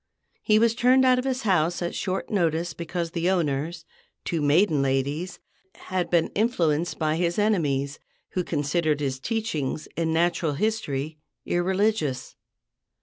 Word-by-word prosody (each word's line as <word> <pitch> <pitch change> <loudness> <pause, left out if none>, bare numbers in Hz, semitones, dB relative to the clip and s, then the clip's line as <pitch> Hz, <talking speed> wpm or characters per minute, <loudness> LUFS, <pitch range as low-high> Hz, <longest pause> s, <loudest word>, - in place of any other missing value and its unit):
He 215 - +3
was 225 +1 +4
turned 255 +2 +4
out 255 -1 +5
of 250 - -3
his 265 -1 -1
house 175 -5 +2
at 175 -1 -3
short 190 -1 -3
notice 170 -4 0
because 170 0 -4
the 170 +1 0
owners, 165 -1 -1 0.4
two 165 -2 -1
maiden 150 +1 +3
ladies, 140 +6 -1 0.4
had 180 -2 -3
been 170 -1 +2
influenced 175 -7 0
by 155 0 0
his 170 0 0
enemies, 145 -10 0 0.3
who 180 - -2
considered 155 0 0
his 135 -2 -2
teachings 160 - -2
in 165 -1 0
natural 165 -1 +1
history 155 -6 -2 0.3
irreligious. 180 - 0
170 Hz, 140 wpm, -25 LUFS, 150-195 Hz, 0.4 s, out